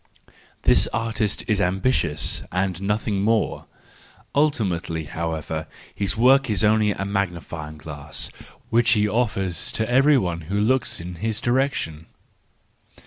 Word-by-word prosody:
—This - - +5
artist 110 -2 -1
is 105 -3 +2
ambitious 90 - 0
and 90 -1 -1
nothing 105 0 0
more; 110 +1 0 0.7
ultimately, 100 - 0
however, 80 0 -4 0.3
his 100 0 -1
work 130 +2 +5
is 100 -5 +1
only 110 0 +4
a 100 -1 -2
magnifying 85 -6 -3
glass, 75 -2 -5 0.4
which 115 +1 +4
he 105 -2 +3
offers 100 -6 -1
to 110 - -1
every 135 +4 +5
one 85 -7 -1
who 100 +1 0
looks 130 +5 +1
in 85 +1 -7
his 110 +2 -2
direction. 120 - -1
100 Hz, 125 wpm, -23 LUFS, 85-115 Hz, 0.7 s, This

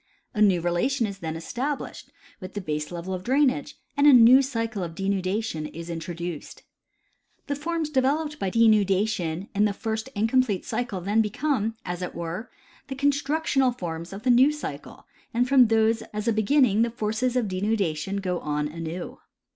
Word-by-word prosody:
A 215 - -2
new 190 -5 +4
relation 175 +10 +1
is 200 -2 -6
then 160 -2 -4
established 250 - -4 0.3
Avith 185 - -8
the 205 - -3
baselevel 170 +3 -4
of 185 0 -5
drainage, 280 +3 +1 0.2
and 285 +1 +4
a 290 - +9
new 250 +2 +8
cycle 230 -5 -3
of 165 -2 -5
denudation 195 -3 -2
is 170 +1 -6
introduced. 170 -1 -6 0.8
The 285 - -2
forms 315 +1 -3
developed 295 +3 0
by 195 - -1
denudation 200 -4 +2
in 205 +1 +3
the 205 - +1
first 220 +4 -4
incomplete 225 -1 +1
cycle 235 -7 -3
then 205 +5 +2
become, 225 0 -1
as 175 0 -4
it 180 - -5
were, 170 +7 -5 0.4
the 270 - -5
constructional 280 -1 +1
forms 170 -7 -6
of 195 +2 -8
the 250 - +4
new 255 +4 +6
cycle, 300 0 -7 0.3
and 245 +1 +2
from 260 -2 +6
those 225 0 +2
as 210 +2 -4
a 230 - +3
beginning 220 0 +3
the 235 - +2
forces 230 +2 -1
of 245 -4 +1
denudation 195 -2 -1
go 180 -2 -1
on 150 0 -2
aiiew. 165 +2 -6
215 Hz, 165 wpm, -25 LUFS, 180-255 Hz, 0.8 s, a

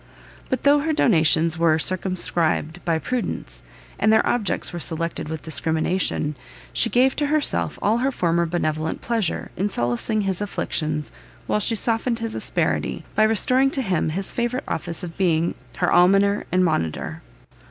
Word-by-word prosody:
But 260 - -1
though 290 +1 +5
her 315 +2 0
donations 165 - +3
were 165 -2 +4
circumscribed 175 -2 -1
by 165 -1 +1
prudence, 250 +9 -3 0.4
and 215 - +3
their 220 - +4
objects 215 -7 -1
were 175 - -4
selected 165 -1 -2
with 160 -1 -5
discrimination, 160 -1 0 0.4
she 230 - +1
gave 255 +3 +3
to 295 - +1
herself 285 - 0
all 220 +3 +2
her 265 +2 +1
former 170 -6 +1
benevolent 160 -2 -2
pleasure, 225 -7 -2
in 200 +3 -1
solacing 120 - 0
his 195 -1 -2
afflictions, 155 -6 -3 0.3
while 210 - 0
she 225 +2 +3
softened 230 +2 +1
his 225 -1 -4
asperity, - - -1
by - - +1
restoring 250 +5 +4
to 270 -1 -2
him 185 -7 0
his 190 +5 -3
favourite 240 +2 -2
office 170 +2 -1
of 165 -2 -7
being 170 -3 +1 0.2
her - - +1
almoner 195 +3 +4
and 185 0 +3
monitor. 80 - -2
185 Hz, 155 wpm, -23 LUFS, 160-230 Hz, 0.4 s, though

